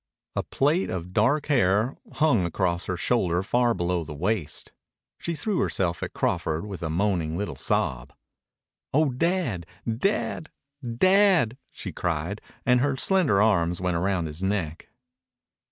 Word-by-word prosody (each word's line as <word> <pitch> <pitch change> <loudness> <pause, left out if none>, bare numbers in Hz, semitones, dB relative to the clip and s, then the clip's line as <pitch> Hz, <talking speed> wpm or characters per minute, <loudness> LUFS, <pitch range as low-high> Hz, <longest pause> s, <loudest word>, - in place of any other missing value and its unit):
A - - +1
plait 155 +7 +1
of 90 0 -5
dark 130 +9 +3
hair 110 -3 +2 0.2
hung 150 -11 +3
across 85 0 0
her 95 - -2
shoulder 90 -4 +1
far 120 +3 +2
below 90 -1 0
the 75 -1 -8
waist. 90 0 -2 0.5
She 170 - -3
threw 200 +3 -1
herself 85 -2 0
at - - -3
Crawford 80 +5 -1
with 100 -3 -7
a 80 - -2
moaning 85 -2 0
little 100 -7 -3
sob. 60 -1 -1 0.8
"Oh 155 0 +4
Dad... 130 - -1 0.3
Dad... 180 -3 -1 0.3
Dad!" 175 - +4 0.2
she - - -7
cried, 85 +4 -2 0.2
and 125 0 +4
her 135 +1 +1
slender 145 - +3
arms 90 -5 +2
went 90 -1 0
round 90 0 0
his 75 +2 -6
neck. 95 -5 -2
100 Hz, 140 wpm, -26 LUFS, 85-130 Hz, 0.8 s, Oh